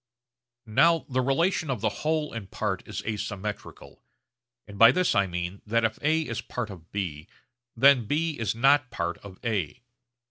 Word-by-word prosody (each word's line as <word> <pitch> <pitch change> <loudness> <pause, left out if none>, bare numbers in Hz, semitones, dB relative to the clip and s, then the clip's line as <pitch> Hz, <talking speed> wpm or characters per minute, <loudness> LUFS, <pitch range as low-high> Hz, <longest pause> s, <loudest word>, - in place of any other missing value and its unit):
Now 165 +9 +3
the 130 0 +1
relation 160 +5 +1
of 125 -5 -3
whole 150 +8 -1
and 110 -5 -7
part 95 -3 -2
is - - -5
asymmetrical; 105 -1 -6 0.7
and 100 -1 -11
by 115 +1 +9
this 180 +5 +1
I 100 - +2
mean 90 +2 -5
that 115 +1 +2
if 110 0 -2
A 155 +2 +2
is 115 -5 -4
part 120 -4 -5
of 85 -3 -13
B, 85 -7 -4 0.5
then 130 -1 +5
B 155 +1 -1
is 115 0 -1
not 135 +2 +4
part 85 0 -3
of 95 -2 -12
A. 110 -1 -2
115 Hz, 165 wpm, -27 LUFS, 100-140 Hz, 0.7 s, by